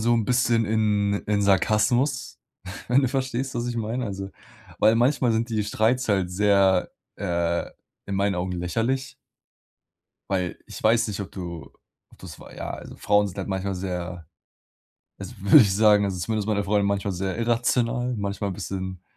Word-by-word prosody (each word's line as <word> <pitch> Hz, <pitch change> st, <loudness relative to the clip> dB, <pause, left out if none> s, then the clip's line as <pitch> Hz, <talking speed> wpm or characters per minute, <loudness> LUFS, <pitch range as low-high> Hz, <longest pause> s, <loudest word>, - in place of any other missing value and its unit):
so 120 Hz, +2 st, +2 dB
'n 115 Hz, -2 st, +1 dB
bisschen 120 Hz, -2 st, +2 dB
in 105 Hz, -2 st, +1 dB
in 105 Hz, -1 st, +1 dB
Sarkasmus. 120 Hz, +6 st, +1 dB, 0.5 s
Wenn 125 Hz, +4 st, +4 dB
du 130 Hz, -, +2 dB
verstehst, 130 Hz, 0 st, -2 dB
was 120 Hz, 0 st, -2 dB
ich 120 Hz, -1 st, -3 dB
meine. 115 Hz, +3 st, -2 dB
Also, 95 Hz, -2 st, -5 dB, 0.5 s
weil 110 Hz, -, +5 dB
manchmal 120 Hz, 0 st, +2 dB
sind 115 Hz, +1 st, 0 dB
die 110 Hz, -3 st, -1 dB
Streits 115 Hz, +4 st, +1 dB
halt 95 Hz, -3 st, +1 dB
sehr, 95 Hz, -1 st, +3 dB, 0.3 s
äh, 85 Hz, 0 st, -1 dB, 0.4 s
in 100 Hz, -, -3 dB
meinen 100 Hz, +1 st, +1 dB
Augen 90 Hz, +1 st, -2 dB
lächerlich. 115 Hz, +10 st, -2 dB, 1.2 s
Weil 90 Hz, -3 st, -1 dB
ich -, -, -9 dB
weiß 115 Hz, +1 st, +3 dB
nicht, 105 Hz, -1 st, -4 dB
ob 100 Hz, -, -6 dB
du, 85 Hz, -5 st, -7 dB, 0.4 s
ob -, -, -21 dB
du -, -, -11 dB
es -, -, -11 dB
wei -, -, -13 dB
ja, -, -, -5 dB
also, -, -, -8 dB
Frauen 105 Hz, 0 st, +2 dB
sind 90 Hz, -, -11 dB
halt -, -, -4 dB
manchmal 95 Hz, 0 st, -2 dB
sehr, 90 Hz, -3 st, -5 dB, 0.9 s
das -, -, -9 dB
würde 100 Hz, +8 st, +7 dB
ich 105 Hz, -9 st, +6 dB
sagen, 105 Hz, -1 st, +5 dB
also 95 Hz, -2 st, -2 dB
zumindest 105 Hz, +4 st, -2 dB
meine 105 Hz, -2 st, 0 dB
Freundin 100 Hz, 0 st, +1 dB
manchmal 100 Hz, -1 st, -1 dB
sehr 95 Hz, +1 st, -3 dB
irrational, 120 Hz, +1 st, 0 dB
manchmal 100 Hz, -1 st, -3 dB
'n -, -, -4 dB
bisschen 95 Hz, -1 st, -5 dB
105 Hz, 175 wpm, -24 LUFS, 95-115 Hz, 1.2 s, würde